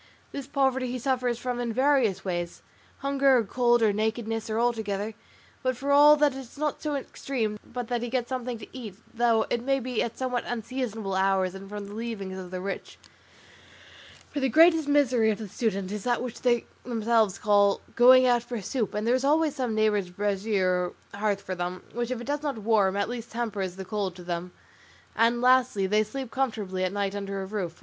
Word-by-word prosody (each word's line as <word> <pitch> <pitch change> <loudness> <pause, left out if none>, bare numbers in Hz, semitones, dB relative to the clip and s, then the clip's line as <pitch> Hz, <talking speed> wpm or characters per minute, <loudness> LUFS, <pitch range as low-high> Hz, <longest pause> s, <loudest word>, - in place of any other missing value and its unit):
This 275 -2 -6
poverty 265 -2 +1
he 255 - -2
suffers 250 -1 0
from 245 0 -3
in 240 -1 -2
various 250 -6 +2
ways, 175 -2 -3 0.4
hunger, 275 -1 +3
or 235 - +2
cold, 240 +2 +2
or 210 -2 +4
nakedness, 220 +1 -2
or 220 - -1
all 240 +1 +3
together; 210 -1 -3 0.5
but 255 -1 -1
for 280 +2 -2
all 295 +1 +8
that 295 -2 +3
it 265 - -6
is 260 0 -12
not 300 0 -2
so 300 -2 -2
extreme 240 -5 -3
but 245 -1 -6
that 240 -1 -1
he 240 - -3
gets 245 -1 -1
something 250 -2 -3
to 220 - -10
eat, 225 -7 -7 0.2
though 230 -2 +3
it 240 - +1
may 270 +2 +1
be 250 -2 -2
at 230 - -3
somewhat 250 -2 -1
unseasonable 225 -3 -3
hours 190 -1 +2
and 195 0 -9
from 205 0 -6
the 205 - -9
leavings 210 -4 -5
of 180 -1 -8
the 185 0 -5
rich; 195 +1 -5 1.3
for 290 - -2
the 265 -1 +1
greatest 325 +3 +5
misery 255 -6 +3
of 210 - 0
the 220 - -6
student 200 -2 -2
is 210 +2 -4
what 245 -1 0
they 240 -2 +1 0.2
themselves 225 -4 +1
call 205 -1 +3 0.2
'going 255 +2 +7
out 245 -1 +4
for 240 -1 -5
soup,' 215 +1 -2
and 210 +1 -1
there 235 - +3
is 260 +1 +1
always 305 +1 +2
some 245 -4 -2
neighbour's 210 -3 +1
brazier 190 -2 0 0.2
or 200 - -8
hearth 205 -2 0
for 185 - -4
them, 180 0 -4
which, 240 +1 -2
if 255 -2 -2
it 240 - -7
does 290 +1 -2
not 285 -5 -2
warm, 205 -3 +2
at 200 - 0
least 240 -1 -6
tempers 205 -6 -3
the 190 0 -7
cold 195 -2 -3
to 180 - -10
them, 175 +1 -4 0.6
and 235 +1 +3
lastly, 250 -5 +4
they 210 +3 +3
sleep 255 +3 -6
comfortably 210 -8 -2
at 185 - 0
night 200 -1 -1
under 200 -1 -4
a - - -5
roof. 190 -4 -4
230 Hz, 210 wpm, -27 LUFS, 200-255 Hz, 1.3 s, all